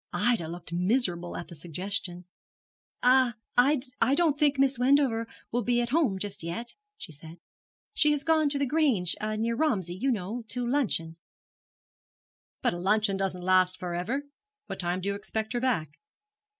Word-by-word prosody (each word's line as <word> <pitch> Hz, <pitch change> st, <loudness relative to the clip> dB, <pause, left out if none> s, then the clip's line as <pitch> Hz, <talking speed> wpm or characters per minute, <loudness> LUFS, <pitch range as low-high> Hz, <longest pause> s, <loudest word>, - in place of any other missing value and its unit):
Ida 195 Hz, -2 st, +1 dB
looked 170 Hz, 0 st, -8 dB
miserable 180 Hz, -2 st, 0 dB
at -, -, -6 dB
the -, -, -11 dB
suggestion. 180 Hz, +3 st, -3 dB, 0.8 s
'I 255 Hz, -1 st, +5 dB, 0.7 s
I 270 Hz, -, +4 dB
don't 320 Hz, -3 st, +3 dB
think 290 Hz, -2 st, +3 dB
Miss 270 Hz, -2 st, +2 dB
Wendover 250 Hz, -3 st, +3 dB, 0.2 s
will 245 Hz, -, 0 dB
be 240 Hz, +1 st, +1 dB
at 240 Hz, -1 st, -1 dB
home 270 Hz, -9 st, +2 dB
just 200 Hz, +1 st, -4 dB
yet,' 175 Hz, +9 st, -5 dB, 0.2 s
she -, -, -9 dB
said. 160 Hz, +2 st, -11 dB, 0.6 s
'She 300 Hz, -, +4 dB
has 295 Hz, -1 st, +1 dB
gone 315 Hz, -2 st, +3 dB
to 285 Hz, -, +3 dB
The 280 Hz, -, +1 dB
Grange, 260 Hz, -, +1 dB
near 215 Hz, +2 st, -1 dB
Romsey, 210 Hz, -, 0 dB
you 220 Hz, +10 st, -1 dB
know, 225 Hz, +1 st, -2 dB
to 245 Hz, +1 st, -1 dB
luncheon.' 205 Hz, -, 0 dB, 1.5 s
'But -, -, +2 dB
a 175 Hz, -, -5 dB
luncheon 205 Hz, +2 st, +2 dB
doesn't 190 Hz, -2 st, -2 dB
last 185 Hz, 0 st, +3 dB
for 180 Hz, -1 st, -5 dB
ever. 225 Hz, +12 st, -2 dB, 0.4 s
What -, -, -7 dB
time 175 Hz, 0 st, -1 dB
do 200 Hz, -, -2 dB
you -, -, 0 dB
expect 220 Hz, +2 st, -3 dB
her 240 Hz, -, 0 dB
back?' 165 Hz, -, -1 dB
215 Hz, 165 wpm, -28 LUFS, 180-260 Hz, 1.5 s, I